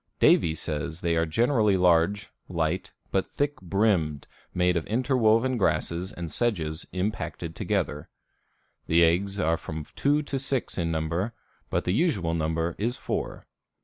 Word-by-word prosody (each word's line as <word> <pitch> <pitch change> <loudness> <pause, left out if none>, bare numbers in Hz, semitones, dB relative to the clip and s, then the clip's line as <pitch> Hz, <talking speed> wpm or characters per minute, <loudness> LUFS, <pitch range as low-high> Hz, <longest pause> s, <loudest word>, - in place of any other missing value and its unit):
Davie 80 -1 +4
says 80 +1 -4
they 85 -1 +1
are 80 0 +1
generally 110 - +3
large, 90 +3 +3 0.2
light, - - -1 0.2
but 95 - 0
thick 145 -4 -1
brimmed, 90 -6 +1 0.3
made 90 0 +2
of 85 - -1
interwoven 125 0 +2
grasses 90 -1 0
and 85 -2 -6
sedges 85 -9 -1
impacted 90 -3 -3
together. 90 -8 -2 0.8
The 85 +1 +5
eggs 95 +4 +2
are 80 -2 +2
from 80 -1 -6
two 145 +2 +2
to 140 -2 -3
six 135 -6 -1
in 85 -1 0
number, 85 +7 -1 0.4
but - - 0
the 90 - 0
usual 105 - +1
number 80 +1 -1
is 120 +4 0
four. - - -4
90 Hz, 145 wpm, -27 LUFS, 80-110 Hz, 0.8 s, The